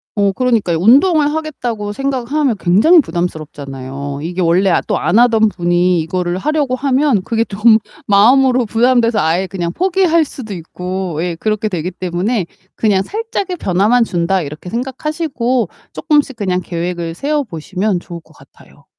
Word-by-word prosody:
어 200 Hz, -1 st, +2 dB
그러니까요. 230 Hz, -9 st, +1 dB
운동을 290 Hz, -, +4 dB
하겠다고 240 Hz, -10 st, -4 dB
생각하면 270 Hz, -1 st, -1 dB
굉장히 215 Hz, -, +5 dB
부담스럽잖아요. 140 Hz, -, -4 dB
이게 175 Hz, +3 st, -3 dB
원래 180 Hz, +3 st, +3 dB
아 -, -, +2 dB
또 -, -, 0 dB
안 205 Hz, -, +1 dB
하던 225 Hz, -3 st, +4 dB
분이 175 Hz, -1 st, +1 dB
이거를 175 Hz, +2 st, -2 dB
하려고 290 Hz, +1 st, 0 dB
하면 270 Hz, -4 st, +1 dB
그게 230 Hz, 0 st, 0 dB
좀 220 Hz, +2 st, +4 dB, 0.3 s
마음으로 245 Hz, +4 st, +4 dB
부담돼서 230 Hz, 0 st, +2 dB
아예 170 Hz, +4 st, +1 dB
그냥 175 Hz, -2 st, -3 dB
포기할 350 Hz, -, +2 dB
수도 225 Hz, -7 st, -8 dB
있고 180 Hz, 0 st, -4 dB
예 175 Hz, -2 st, -2 dB
그렇게 215 Hz, +3 st, -1 dB
되기 180 Hz, 0 st, -3 dB
때문에 185 Hz, +4 st, -2 dB, 0.3 s
그냥 205 Hz, -4 st, +2 dB
'살짝의 405 Hz, -, -4 dB
변화만 210 Hz, -, +2 dB
준다.' 180 Hz, -1 st, 0 dB
이렇게 150 Hz, +4 st, -8 dB
생각하시고 260 Hz, -, -2 dB, 0.2 s
쪼끔씩 295 Hz, -5 st, +1 dB
그냥 185 Hz, -4 st, -1 dB
계획을 170 Hz, -1 st, -4 dB
세워 290 Hz, -, -1 dB
보시면 185 Hz, +1 st, -3 dB
좋을 170 Hz, -1 st, -9 dB
것 -, -, -22 dB
같아요. -, -, -20 dB
210 Hz, 360 characters per minute, -16 LUFS, 175-255 Hz, 0.3 s, 굉장히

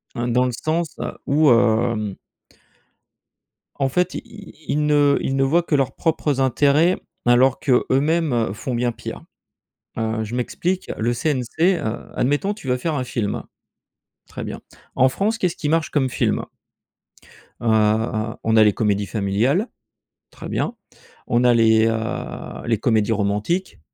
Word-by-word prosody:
hein, 120 Hz, +1 st, -2 dB
dans 125 Hz, +1 st, +3 dB
le 125 Hz, -, 0 dB
sens 155 Hz, +6 st, -2 dB, 0.3 s
où, 150 Hz, +1 st, +4 dB
hem 110 Hz, -3 st, +2 dB, 1.6 s
en 135 Hz, -1 st, +1 dB
fait, 180 Hz, +7 st, 0 dB
ils 220 Hz, -4 st, -10 dB
ils 150 Hz, +1 st, 0 dB
ne 145 Hz, -1 st, +4 dB
ils 135 Hz, -, -1 dB
ne 135 Hz, -, +2 dB
voient 165 Hz, +6 st, +2 dB
que 160 Hz, -, 0 dB
leurs 135 Hz, -2 st, 0 dB
propres 155 Hz, -4 st, 0 dB
intérêts 145 Hz, +7 st, +3 dB, 0.3 s
alors 125 Hz, +2 st, +4 dB
que 130 Hz, -4 st, +2 dB
eux-mêmes 135 Hz, -, +1 dB
font 125 Hz, +4 st, -4 dB
bien 120 Hz, 0 st, 0 dB
pire. -, -, -8 dB, 0.7 s
Heu, 110 Hz, 0 st, -1 dB
je 110 Hz, +3 st, -5 dB
m'explique. 180 Hz, +9 st, -2 dB
Le 115 Hz, +2 st, 0 dB
CNC 155 Hz, +7 st, +1 dB
heu, 110 Hz, +1 st, -4 dB
admettons, 145 Hz, +10 st, +1 dB
tu 205 Hz, -10 st, -11 dB
veux 125 Hz, 0 st, +1 dB
faire 155 Hz, +5 st, -2 dB
un 130 Hz, -, -1 dB
film. 110 Hz, -4 st, -3 dB, 0.8 s
Très -, -, -7 dB
bien. -, -, -6 dB, 0.4 s
En 130 Hz, -, +5 dB
France, 210 Hz, -, -1 dB
qu'est-ce 180 Hz, -5 st, -1 dB
qui 150 Hz, -, -3 dB
marche 165 Hz, 0 st, +1 dB
comme 135 Hz, -3 st, +1 dB
film? -, -, 0 dB, 1.2 s
Heu, 110 Hz, 0 st, +1 dB
on 110 Hz, 0 st, +2 dB
a 110 Hz, -, +7 dB
les 105 Hz, -2 st, +4 dB
comédies 105 Hz, -2 st, 0 dB
familiales. 110 Hz, -, 0 dB, 0.6 s
Très -, -, -9 dB
bien. 240 Hz, -, -2 dB, 0.5 s
On 120 Hz, +1 st, +2 dB
a 125 Hz, -1 st, +5 dB
les, 110 Hz, -1 st, +4 dB
heu, 115 Hz, 0 st, -4 dB
les 115 Hz, -1 st, +2 dB
comédies 110 Hz, -2 st, +1 dB
romantiques, 105 Hz, -, -1 dB
125 Hz, 150 wpm, -21 LUFS, 115-150 Hz, 1.6 s, a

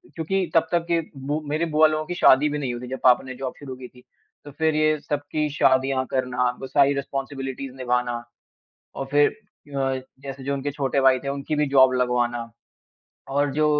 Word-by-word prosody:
क्योंकि 185 Hz, +3 st, -1 dB
तब 165 Hz, 0 st, +4 dB
तक 170 Hz, -1 st, +1 dB
के 170 Hz, -, +3 dB, 0.3 s
बु 150 Hz, +2 st, 0 dB
मेरे 155 Hz, +3 st, 0 dB
बुआ 155 Hz, 0 st, +7 dB
लोगों 155 Hz, 0 st, -2 dB
की 175 Hz, -, -4 dB
शादी 145 Hz, 0 st, +5 dB
भी 150 Hz, -, -2 dB
नहीं 130 Hz, -4 st, -2 dB
हुई 120 Hz, +1 st, -7 dB
थी -, -, -6 dB
जब 130 Hz, -, -4 dB
पापा 125 Hz, 0 st, +5 dB
ने 130 Hz, -1 st, -7 dB
जॉब 130 Hz, 0 st, -5 dB
शुरू 135 Hz, -3 st, -7 dB
की 125 Hz, -1 st, -10 dB
थी। 125 Hz, 0 st, -19 dB, 0.4 s
तो 145 Hz, -, -9 dB
फिर 160 Hz, +1 st, 0 dB
ये 155 Hz, 0 st, +3 dB
सबकी 145 Hz, +1 st, -2 dB
शादियाँ 130 Hz, -1 st, +2 dB
करना, 125 Hz, -1 st, 0 dB
वो 135 Hz, -, -6 dB
सारी 140 Hz, +1 st, +4 dB
रिस्पांसिबिलिटीज़ 135 Hz, -1 st, -5 dB
निभाना 125 Hz, -2 st, -1 dB, 0.7 s
और 135 Hz, -, -4 dB
फिर 145 Hz, 0 st, +5 dB
अ, 140 Hz, -10 st, -5 dB, 0.2 s
जैसे 135 Hz, -1 st, -8 dB
जो 140 Hz, +1 st, -1 dB
उनके 140 Hz, +1 st, -3 dB
छोटे 140 Hz, -1 st, -1 dB
भाई 130 Hz, -1 st, +5 dB
थे, 140 Hz, -, -5 dB
उनकी 140 Hz, +2 st, -3 dB
भी 150 Hz, -1 st, +1 dB
जॉब 130 Hz, -1 st, +6 dB
लगवाना। 120 Hz, -1 st, 0 dB, 0.8 s
और 145 Hz, +1 st, +1 dB
जो 155 Hz, +1 st, +2 dB
140 Hz, 200 wpm, -24 LUFS, 130-150 Hz, 0.8 s, बुआ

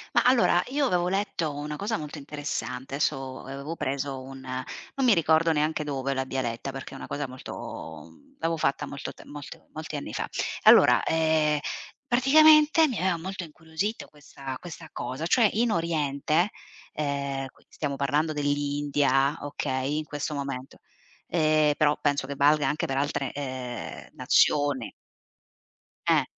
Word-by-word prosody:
Ma -, -, +5 dB
allora 250 Hz, -1 st, +4 dB
io 280 Hz, 0 st, +1 dB
avevo 175 Hz, -3 st, +1 dB
letto 185 Hz, -5 st, -1 dB
una 150 Hz, +1 st, -4 dB
cosa 205 Hz, +6 st, -2 dB
molto 150 Hz, -1 st, -7 dB
interessante, 140 Hz, -2 st, -4 dB
adesso 135 Hz, -3 st, -1 dB
avevo 140 Hz, +4 st, -6 dB
preso 135 Hz, -2 st, -2 dB
un 135 Hz, 0 st, -9 dB
non 130 Hz, -, -4 dB
mi 235 Hz, -, +7 dB
ricordo 165 Hz, -1 st, +3 dB
neanche 155 Hz, 0 st, +1 dB
dove 135 Hz, -2 st, -2 dB
l'abbia 130 Hz, 0 st, -1 dB
letta 120 Hz, +3 st, -3 dB
perché 135 Hz, 0 st, -8 dB
è -, -, -7 dB
una -, -, -7 dB
cosa 145 Hz, -1 st, -3 dB
molto 80 Hz, -, -8 dB
mhmm, 80 Hz, -, -22 dB
l'avevo 165 Hz, 0 st, 0 dB
fatta 145 Hz, -1 st, 0 dB
molto 140 Hz, -, -6 dB
te -, -, -14 dB
molte 145 Hz, -1 st, -10 dB
molti -, -, -5 dB
anni -, -, -6 dB
fa. -, -, -2 dB, 0.4 s
Allora, -, -, +7 dB
ehm, 160 Hz, -2 st, +2 dB, 0.5 s
praticamente, 305 Hz, +5 st, +6 dB
mi 250 Hz, -, -3 dB
aveva 180 Hz, -2 st, +1 dB
molto 185 Hz, +2 st, -5 dB
incuriosito 160 Hz, +7 st, -4 dB
questa 140 Hz, -3 st, -8 dB
questa 175 Hz, -2 st, -9 dB
cosa, 130 Hz, +7 st, -4 dB
cioè 230 Hz, +2 st, +5 dB
in 230 Hz, +2 st, +2 dB
oriente, 160 Hz, +1 st, +1 dB, 0.4 s
ehm, 140 Hz, -2 st, -2 dB
qui -, -, -26 dB
stiamo 140 Hz, -2 st, -3 dB
parlando 150 Hz, +3 st, +1 dB
dell'India, 145 Hz, -1 st, +1 dB
okay, 140 Hz, -1 st, -2 dB
in 155 Hz, -, -5 dB
questo 145 Hz, +1 st, -4 dB
momento, 140 Hz, -2 st, -5 dB, 0.5 s
ehm, 155 Hz, -2 st, +3 dB
però 150 Hz, -1 st, +4 dB
penso 145 Hz, -2 st, +1 dB
che 140 Hz, -, -4 dB
valga 145 Hz, +1 st, +4 dB
anche 150 Hz, -, -1 dB
per 135 Hz, 0 st, -2 dB
altre, 140 Hz, -2 st, -1 dB
ehm, 130 Hz, -4 st, -6 dB
nazioni. 145 Hz, -4 st, +2 dB, 1.2 s
Eh. -, -, +4 dB
145 Hz, 150 wpm, -27 LUFS, 135-165 Hz, 1.2 s, mi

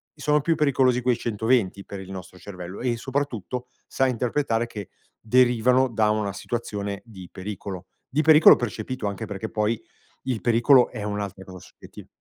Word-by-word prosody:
sono 150 Hz, 0 st, +2 dB
più 165 Hz, +2 st, +1 dB
pericolosi 130 Hz, -4 st, +2 dB
quei 125 Hz, -1 st, +1 dB
120 110 Hz, -3 st, 0 dB
per 100 Hz, -, -7 dB
il 95 Hz, 0 st, -10 dB
nostro 90 Hz, -1 st, -9 dB
cervello 90 Hz, -1 st, -8 dB
e 120 Hz, -2 st, 0 dB
soprattutto 125 Hz, -2 st, -3 dB, 0.2 s
sa 135 Hz, -, +1 dB
interpretare 120 Hz, -1 st, 0 dB
che 105 Hz, -5 st, -8 dB, 0.3 s
derivano 125 Hz, +2 st, +3 dB
da 110 Hz, -2 st, +1 dB
una 105 Hz, -3 st, -1 dB
situazione 100 Hz, -3 st, -4 dB
di 95 Hz, -6 st, -12 dB
pericolo, 95 Hz, -1 st, -7 dB, 0.2 s
di 145 Hz, +4 st, +1 dB
pericolo 155 Hz, 0 st, +8 dB
percepito 120 Hz, +1 st, -4 dB
anche 100 Hz, +3 st, -4 dB
perché 105 Hz, +1 st, -5 dB
poi 110 Hz, +1 st, -1 dB, 0.4 s
il 125 Hz, -4 st, -2 dB
pericolo 120 Hz, +2 st, +5 dB
è 110 Hz, -4 st, -7 dB
un'altra 100 Hz, -2 st, -4 dB
cosa 95 Hz, -1 st, -10 dB
soggettiva. -, -, -14 dB
115 Hz, 155 wpm, -24 LUFS, 100-125 Hz, 0.4 s, pericolo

